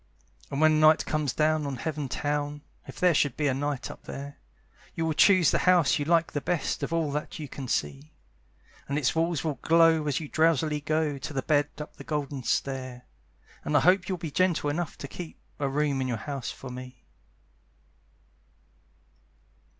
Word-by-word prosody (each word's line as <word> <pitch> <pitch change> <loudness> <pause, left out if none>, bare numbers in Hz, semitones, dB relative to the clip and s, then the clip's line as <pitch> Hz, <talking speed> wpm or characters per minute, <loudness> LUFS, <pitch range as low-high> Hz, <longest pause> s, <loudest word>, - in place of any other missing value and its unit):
And 140 - -3
when 155 0 +5
night 155 0 +5
comes 150 -4 -1
down 155 0 +1
on 140 - -3
Heaven 145 +2 -4
town 145 +2 -2 0.2
(If - - -10
there 180 -1 +4
should 145 -4 +1
be 145 -3 +1
night 140 0 -3
up - - -14
there) 140 +1 -8 0.6
You 165 - -1
will 160 - 0
choose 185 0 +5
the - - +1
house 175 -6 +4
you 145 - -1
like 165 +1 +2
the 145 - -2
best 175 -1 -1
Of - - -3
all 165 -3 0
that 150 +1 -4
you 150 - -6
can 135 0 -7
see: 75 - -2 0.8
And 140 - 0
its 140 -5 +1
walls 165 -2 0
will 150 -6 -2
glow 165 -2 +4
as 145 -1 0
you 155 - -6
drowsily 155 -1 +2
go 155 -1 0
To 145 +3 -6
the 135 -2 -2
bed 145 -1 +2
up 150 - -8
the - - -9
golden 145 -3 -3
stair, 130 0 -2 0.6
And 150 - +2
I - - +4
hope 180 +3 +3
you'll 185 - -1
be 165 -3 -6
gentle 170 -3 +1
enough 165 +1 -3
to 140 - -7
keep 170 +3 -8 0.2
A 140 -2 0
room 140 -1 0
in 130 - -1
your 120 -2 -1
house 135 +3 -5
for 130 - -8
me. 125 0 -10
150 Hz, 190 wpm, -27 LUFS, 140-160 Hz, 0.8 s, when